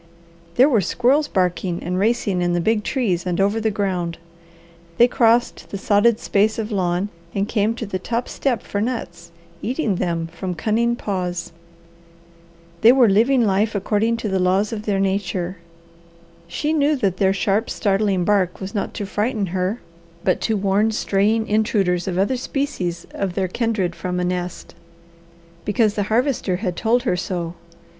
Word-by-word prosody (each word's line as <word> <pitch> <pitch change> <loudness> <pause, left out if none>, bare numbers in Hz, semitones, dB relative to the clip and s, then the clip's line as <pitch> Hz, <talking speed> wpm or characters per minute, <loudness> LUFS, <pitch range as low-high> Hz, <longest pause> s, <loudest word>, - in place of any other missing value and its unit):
There 255 +3 +6
were 235 -8 +3
squirrels 265 - +2
barking 180 -3 -1
and 180 +1 -2
racing 205 -3 +1
in 175 0 +1
the 175 - +1
big 215 +4 +1
trees 200 -11 0
and 175 0 -1
over 200 +3 +2
the 220 - +1
ground. 185 -5 -2 0.8
They 240 - +7
crossed 240 0 +2
the 200 - -4
sodded 210 +3 +3
space 210 +2 +1
of 225 0 -3
lawn 185 0 0 0.3
and 200 +1 0
came 220 +1 +1
to 230 - -5
the 190 -2 -4
top 235 +5 -2
step 250 -6 -1
for 200 - -3
nuts, 175 -8 -4 0.3
eating 240 - -1
them 170 -2 -1
from 180 +2 -4
cunning 230 +7 +1
paws. 180 -6 -3 1.3
They 225 - +8
were 255 -2 +5
living 230 +5 +4
life 210 +2 +1
according 215 +3 +1
to 225 - -4
the 190 -2 0
laws 190 +4 +1
of 215 -1 -5
their 200 -2 +1
nature. 190 -2 -1 0.9
She 295 - -1
knew 300 0 +3
that 200 -9 0
their 190 -1 +3
sharp, 200 +3 0
startling 195 -3 +1
bark 190 -3 +1
was 190 +1 -6
not 205 - -3
to 205 - -3
frighten 210 +1 -1
her, 190 +5 -1 0.4
but 185 - +1
to 220 -2 0
warn 200 +2 +2
straying 215 +1 +1
intruders 200 -4 +1
of 180 -2 -2
other 205 +7 +1
species 190 -11 -3
of 190 -3 -3
their 190 -2 0
kindred 195 -4 -1
from 180 0 -3
a - - 0
nest, 180 0 -4 0.9
because 210 0 +2
the 210 - -1
Harvester 235 -5 +1
had 180 -2 -3
told 235 +5 +1
her 235 - +1
so. 175 -2 -3
200 Hz, 165 wpm, -21 LUFS, 185-225 Hz, 1.3 s, They